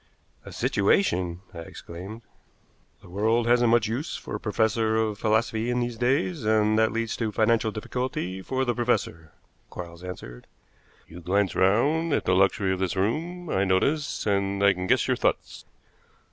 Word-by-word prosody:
"A -, -, -10 dB
situation!" 95 Hz, -, +1 dB
I 85 Hz, -, -8 dB
exclaimed. 90 Hz, +6 st, -9 dB, 0.8 s
"The -, -, -14 dB
world 110 Hz, +4 st, +1 dB
hasn't 120 Hz, 0 st, +4 dB
much 115 Hz, -1 st, +3 dB
use 125 Hz, +9 st, -3 dB
for -, -, -9 dB
a -, -, -2 dB
professor 110 Hz, 0 st, +1 dB
of 110 Hz, -2 st, 0 dB
philosophy 110 Hz, +1 st, +1 dB
in 125 Hz, 0 st, 0 dB
these 120 Hz, -1 st, -2 dB
days, 135 Hz, +6 st, 0 dB
and 110 Hz, 0 st, +3 dB
that 110 Hz, 0 st, +3 dB
leads 115 Hz, 0 st, -2 dB
to 110 Hz, -2 st, -2 dB
financial 110 Hz, +1 st, +2 dB
difficulty 105 Hz, -4 st, -4 dB
for 130 Hz, +6 st, -2 dB
the 120 Hz, -, +1 dB
professor," 85 Hz, -10 st, -1 dB, 0.4 s
Quarles 85 Hz, 0 st, -9 dB
answered. 60 Hz, -10 st, -9 dB, 0.6 s
"You 85 Hz, -, -11 dB
glance 95 Hz, +3 st, +1 dB
round 145 Hz, -, +2 dB
at -, -, 0 dB
the 90 Hz, -, +2 dB
luxury 95 Hz, 0 st, +2 dB
of 95 Hz, -, -4 dB
this 95 Hz, 0 st, -1 dB
room, 165 Hz, -, -2 dB
I 95 Hz, -, +2 dB
notice, 140 Hz, +11 st, 0 dB
and 100 Hz, -1 st, 0 dB
I 100 Hz, -1 st, +6 dB
can 90 Hz, 0 st, -5 dB
guess -, -, +2 dB
your -, -, +1 dB
thoughts. -, -, -2 dB
110 Hz, 165 wpm, -26 LUFS, 95-120 Hz, 0.8 s, I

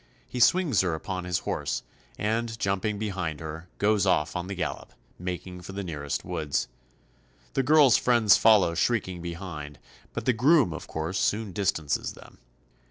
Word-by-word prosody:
He 125 Hz, -, -5 dB
swings 145 Hz, -, +4 dB
her 90 Hz, -4 st, 0 dB
upon 90 Hz, +2 st, -5 dB
his 90 Hz, -1 st, 0 dB
horse, -, -, -2 dB, 0.3 s
and 115 Hz, +2 st, -1 dB
jumping 100 Hz, +1 st, -1 dB
behind 95 Hz, -7 st, -3 dB
her, 80 Hz, +2 st, -7 dB
goes 105 Hz, -1 st, +2 dB
off 80 Hz, -4 st, +2 dB
on 90 Hz, 0 st, -3 dB
the 100 Hz, -, -4 dB
gallop, 90 Hz, -, -4 dB, 0.3 s
making 90 Hz, 0 st, -5 dB
for 95 Hz, -, -9 dB
the 100 Hz, 0 st, -4 dB
nearest 75 Hz, -5 st, -4 dB
woods. 80 Hz, -5 st, -1 dB, 0.9 s
The -, -, +2 dB
girl's 145 Hz, -2 st, +6 dB
friends 120 Hz, -4 st, +5 dB
follow 105 Hz, -6 st, +5 dB
shrieking 95 Hz, -2 st, 0 dB
behind, 85 Hz, -4 st, -7 dB, 0.4 s
but 115 Hz, -, -4 dB
the 125 Hz, -, +4 dB
groom 130 Hz, -, +4 dB
of 80 Hz, -, -8 dB
course 80 Hz, +5 st, -3 dB
soon 105 Hz, 0 st, 0 dB
distances 80 Hz, -7 st, -1 dB
them. -, -, -16 dB
95 Hz, 160 wpm, -27 LUFS, 85-110 Hz, 0.9 s, girl's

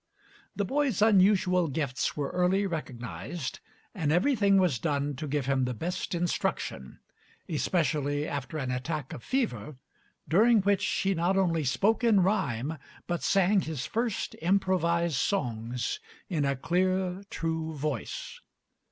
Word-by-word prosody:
The 205 Hz, -, 0 dB
boy's 275 Hz, 0 st, 0 dB
unusual 185 Hz, -4 st, +4 dB
gifts 140 Hz, -2 st, -2 dB
were 145 Hz, -2 st, -2 dB
early 180 Hz, +3 st, +2 dB
recognized, 145 Hz, -, -5 dB, 0.3 s
and 160 Hz, -9 st, -1 dB
everything 200 Hz, -, +3 dB
was 175 Hz, -, +2 dB
done 145 Hz, -1 st, -1 dB
to 155 Hz, +2 st, -4 dB
give 145 Hz, -1 st, -1 dB
him 135 Hz, -1 st, +1 dB
the 125 Hz, -1 st, -3 dB
best 175 Hz, +6 st, -3 dB
instruction, 170 Hz, -, -2 dB, 0.5 s
especially 150 Hz, -2 st, 0 dB
after 145 Hz, +2 st, -4 dB
an 130 Hz, -4 st, -2 dB
attack 135 Hz, +2 st, -3 dB
of -, -, -7 dB
fever, 150 Hz, -, -2 dB, 0.5 s
during 215 Hz, +8 st, +5 dB
which 200 Hz, 0 st, +2 dB
he 195 Hz, 0 st, +1 dB
not 175 Hz, +2 st, +1 dB
only 170 Hz, -4 st, +2 dB
spoke 205 Hz, -, +1 dB
in 220 Hz, -5 st, +5 dB
rhyme, 155 Hz, -, 0 dB, 0.3 s
but 175 Hz, -1 st, -2 dB
sang 195 Hz, 0 st, +3 dB
his 155 Hz, -7 st, -4 dB
first 230 Hz, -2 st, -2 dB
improvised 170 Hz, -3 st, +1 dB
songs 125 Hz, -, -1 dB, 0.3 s
in 155 Hz, -6 st, 0 dB
a 140 Hz, 0 st, +1 dB
clear, 185 Hz, +5 st, 0 dB
true 160 Hz, -4 st, -3 dB
voice. 145 Hz, -5 st, -4 dB
170 Hz, 135 wpm, -29 LUFS, 140-195 Hz, 0.5 s, during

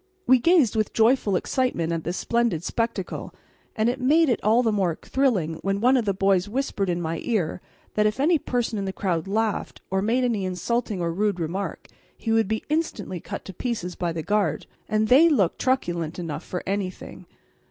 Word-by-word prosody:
We 255 Hz, 0 st, +6 dB
gazed 310 Hz, -, +4 dB
with 215 Hz, -2 st, 0 dB
joyful 225 Hz, -3 st, +3 dB
excitement 180 Hz, -6 st, 0 dB
at 165 Hz, -1 st, -3 dB
this 175 Hz, +3 st, -2 dB
splendid 235 Hz, -9 st, 0 dB
spectacle, 230 Hz, -2 st, -3 dB, 0.4 s
and 220 Hz, 0 st, +1 dB
it 250 Hz, +2 st, -1 dB
made 305 Hz, +4 st, +4 dB
it 240 Hz, -, 0 dB
all 225 Hz, +4 st, +4 dB
the 225 Hz, -, +2 dB
more 185 Hz, -6 st, 0 dB
thrilling 195 Hz, -, 0 dB
when 195 Hz, 0 st, -1 dB
one 250 Hz, +5 st, +4 dB
of 245 Hz, -4 st, +1 dB
the 200 Hz, -, +2 dB
boys 195 Hz, 0 st, +2 dB
whispered 215 Hz, -5 st, -1 dB
in 175 Hz, 0 st, 0 dB
my 165 Hz, -1 st, -3 dB
ear 180 Hz, -8 st, -1 dB, 0.3 s
that 210 Hz, 0 st, +3 dB
if 215 Hz, +4 st, -2 dB
any 315 Hz, +3 st, +3 dB
person 240 Hz, -5 st, -1 dB
in 195 Hz, -, -2 dB
the 190 Hz, -, -3 dB
crowd 175 Hz, -4 st, -1 dB
laughed 215 Hz, +1 st, -1 dB
or 190 Hz, 0 st, +1 dB
made 235 Hz, +5 st, +1 dB
any 230 Hz, -5 st, 0 dB
insulting 190 Hz, +2 st, -2 dB
or 170 Hz, -1 st, 0 dB
rude 200 Hz, 0 st, 0 dB
remark, 175 Hz, +5 st, -4 dB, 0.3 s
he 225 Hz, -, -3 dB
would 225 Hz, -2 st, +3 dB
be 220 Hz, +1 st, -2 dB
instantly 295 Hz, -, -2 dB
cut 200 Hz, -, -7 dB
to 190 Hz, -, -8 dB
pieces 195 Hz, -4 st, -3 dB
by 175 Hz, -1 st, -2 dB
the 165 Hz, -1 st, -4 dB
guard. 210 Hz, +2 st, 0 dB, 0.2 s
And 215 Hz, 0 st, +1 dB
they 285 Hz, +9 st, +7 dB
looked 205 Hz, -, +2 dB
truculent 175 Hz, -12 st, -1 dB
enough 165 Hz, -2 st, -5 dB
for 180 Hz, -, -5 dB
anything. 195 Hz, -1 st, -4 dB
210 Hz, 195 wpm, -24 LUFS, 180-240 Hz, 0.4 s, they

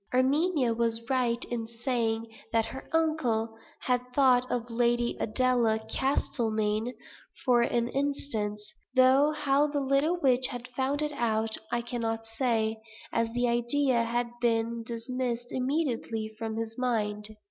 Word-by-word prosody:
Erminia 270 Hz, 0 st, +2 dB
was 230 Hz, 0 st, 0 dB
right 245 Hz, -2 st, +1 dB
in 230 Hz, -2 st, -2 dB
saying 230 Hz, -1 st, -1 dB, 0.3 s
that 225 Hz, -1 st, +2 dB
her 265 Hz, -, -8 dB
uncle 255 Hz, -9 st, +1 dB, 0.3 s
had 250 Hz, -1 st, +1 dB
thought 255 Hz, -2 st, +4 dB
of 240 Hz, -1 st, -1 dB
Lady 240 Hz, 0 st, +1 dB
Adela 235 Hz, -1 st, +2 dB
Castlemayne 220 Hz, -1 st, -1 dB, 0.5 s
for 245 Hz, -3 st, +5 dB
an 235 Hz, 0 st, +1 dB
instant; 255 Hz, -6 st, -2 dB, 0.4 s
though 260 Hz, +3 st, +6 dB
how 290 Hz, -1 st, +2 dB
the 290 Hz, -1 st, -1 dB
little 275 Hz, +5 st, +2 dB
witch 260 Hz, -4 st, +4 dB
had 245 Hz, -1 st, -6 dB
found 265 Hz, +4 st, 0 dB
it 300 Hz, -, -1 dB
out 225 Hz, -4 st, 0 dB, 0.2 s
I 240 Hz, 0 st, 0 dB
cannot 225 Hz, -2 st, -3 dB
say, 225 Hz, -1 st, 0 dB, 0.4 s
as 230 Hz, 0 st, +1 dB
the 245 Hz, 0 st, +1 dB
idea 240 Hz, +1 st, +2 dB
had 235 Hz, +1 st, -1 dB
been 230 Hz, 0 st, +1 dB
dismissed 240 Hz, +1 st, -4 dB
immediately 250 Hz, -5 st, -1 dB
from 220 Hz, 0 st, -4 dB
his 225 Hz, +1 st, -4 dB
mind. 215 Hz, -3 st, -1 dB
240 Hz, 135 wpm, -29 LUFS, 225-260 Hz, 0.5 s, though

